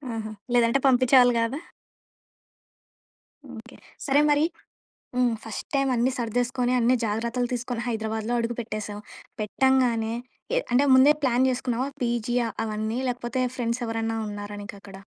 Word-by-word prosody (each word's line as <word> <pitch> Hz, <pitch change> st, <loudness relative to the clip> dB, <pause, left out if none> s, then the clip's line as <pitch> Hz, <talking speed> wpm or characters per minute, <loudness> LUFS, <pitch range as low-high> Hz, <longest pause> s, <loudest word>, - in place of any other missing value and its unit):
ఆహా! 215 Hz, -1 st, -5 dB, 0.2 s
లేదంటే 240 Hz, +2 st, +4 dB
పంపిచేవాళ్ళు 250 Hz, -1 st, +5 dB
గాదా? 235 Hz, +6 st, -1 dB, 2.0 s
ఓకే. 235 Hz, +3 st, -12 dB, 0.3 s
సరే! 280 Hz, 0 st, +3 dB
మరి 295 Hz, +2 st, +4 dB, 0.7 s
హ్మ్. 250 Hz, -1 st, +3 dB
ఫస్ట్‌ 220 Hz, -, -7 dB
టైమ్ 275 Hz, -1 st, +2 dB
అన్నీ 245 Hz, +2 st, +2 dB
సర్దేసుకొని 245 Hz, +2 st, 0 dB
అన్నీ 240 Hz, +2 st, +3 dB
జాగ్రత్తలు 235 Hz, +3 st, -1 dB
తీసుకొని 245 Hz, -1 st, -3 dB
హైదరాబాద్‌లో 220 Hz, 0 st, -2 dB
అడుగు 235 Hz, +1 st, -2 dB
పెట్టేసావు. 210 Hz, -2 st, -5 dB, 0.4 s
పెట్టంగానే 235 Hz, 0 st, +1 dB, 0.4 s
ఎ -, -, +5 dB
అంటే 260 Hz, +4 st, +4 dB
ముందే 265 Hz, +3 st, +7 dB
ప్లాన్ 255 Hz, -1 st, +3 dB
జేసుకున్నావా 255 Hz, 0 st, -1 dB
పీజీ 240 Hz, 0 st, -1 dB
ఆ -, -, -2 dB, 0.2 s
అవన్నీ? 220 Hz, +2 st, -2 dB
లేకపోతే 245 Hz, +1 st, -2 dB, 0.2 s
ఫ్రెండ్స్ 235 Hz, 0 st, -1 dB
ఎవరన్నా 225 Hz, 0 st, -2 dB
ఉన్నారా 205 Hz, 0 st, -6 dB
నీకక్కడ? 200 Hz, -2 st, -10 dB
240 Hz, 125 wpm, -25 LUFS, 225-255 Hz, 2.0 s, ముందే